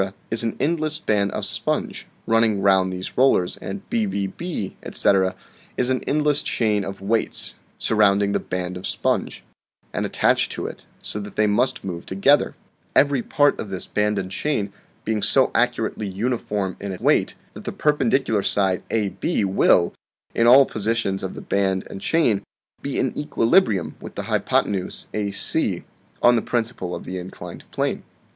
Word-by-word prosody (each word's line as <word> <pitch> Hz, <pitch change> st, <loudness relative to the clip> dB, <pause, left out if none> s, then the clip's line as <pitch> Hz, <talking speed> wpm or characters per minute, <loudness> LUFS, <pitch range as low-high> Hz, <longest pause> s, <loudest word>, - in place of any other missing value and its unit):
is 115 Hz, -, +3 dB
an 115 Hz, -1 st, -2 dB
endless 155 Hz, +1 st, 0 dB
band 105 Hz, -9 st, +1 dB
of -, -, -3 dB
sponge, -, -, -3 dB, 0.2 s
running 115 Hz, -2 st, +3 dB
round 95 Hz, -1 st, +3 dB
these 90 Hz, 0 st, -6 dB
rollers; 130 Hz, -9 st, +4 dB
and 200 Hz, 0 st, -7 dB
bbb, 175 Hz, -, -2 dB
etc., 95 Hz, -2 st, +2 dB, 0.4 s
is 125 Hz, +1 st, +2 dB
an 130 Hz, -, 0 dB
endless 150 Hz, 0 st, +2 dB
chain 105 Hz, -3 st, 0 dB
of 95 Hz, 0 st, -6 dB
weights, 110 Hz, +3 st, 0 dB, 0.2 s
surrounding 100 Hz, -2 st, +3 dB
the -, -, +1 dB
band 90 Hz, 0 st, -4 dB
of 90 Hz, -, -4 dB
sponge, -, -, -1 dB, 0.5 s
and -, -, -1 dB
attached -, -, +2 dB
to -, -, -4 dB
it, -, -, -8 dB, 0.2 s
so 105 Hz, -, -3 dB
that 100 Hz, -1 st, -8 dB
they 105 Hz, -, +3 dB
must 105 Hz, +5 st, +1 dB
move 85 Hz, -3 st, -5 dB
together; 100 Hz, +10 st, +3 dB, 0.4 s
every 140 Hz, -3 st, +4 dB
part 145 Hz, +4 st, +2 dB
of 105 Hz, -, -5 dB
this 95 Hz, -2 st, -3 dB
band 105 Hz, 0 st, 0 dB
and 95 Hz, -1 st, -3 dB
chain 105 Hz, -7 st, -1 dB, 0.3 s
being 110 Hz, -1 st, 0 dB
so -, -, +4 dB
accurately 105 Hz, -, 0 dB
uniform 100 Hz, -2 st, -2 dB
in 100 Hz, -2 st, -5 dB
weight -, -, +2 dB, 0.2 s
that -, -, -11 dB
the -, -, -2 dB
perpendicular 135 Hz, -6 st, +1 dB
side 95 Hz, -2 st, +3 dB
AB 110 Hz, -, 0 dB
will, 95 Hz, -2 st, +3 dB, 0.4 s
in 115 Hz, -, +3 dB
all 135 Hz, +3 st, +8 dB
positions 110 Hz, -3 st, -1 dB
of 95 Hz, -, -5 dB
the -, -, -7 dB
band 95 Hz, -1 st, 0 dB
and 95 Hz, -, -7 dB
chain, 120 Hz, -12 st, +2 dB, 0.4 s
be 140 Hz, -, -3 dB
in 130 Hz, -, 0 dB
equilibrium 120 Hz, -, +2 dB
with -, -, -10 dB
the -, -, -4 dB
hypothenuse 95 Hz, -3 st, -1 dB
AC, 100 Hz, -2 st, 0 dB, 0.4 s
on 120 Hz, 0 st, +7 dB
the 115 Hz, -, +2 dB
principle 115 Hz, -7 st, -2 dB
of -, -, -7 dB
the 95 Hz, 0 st, -4 dB
inclined 90 Hz, +1 st, -9 dB
plane. -, -, -1 dB
105 Hz, 160 wpm, -23 LUFS, 95-125 Hz, 0.5 s, all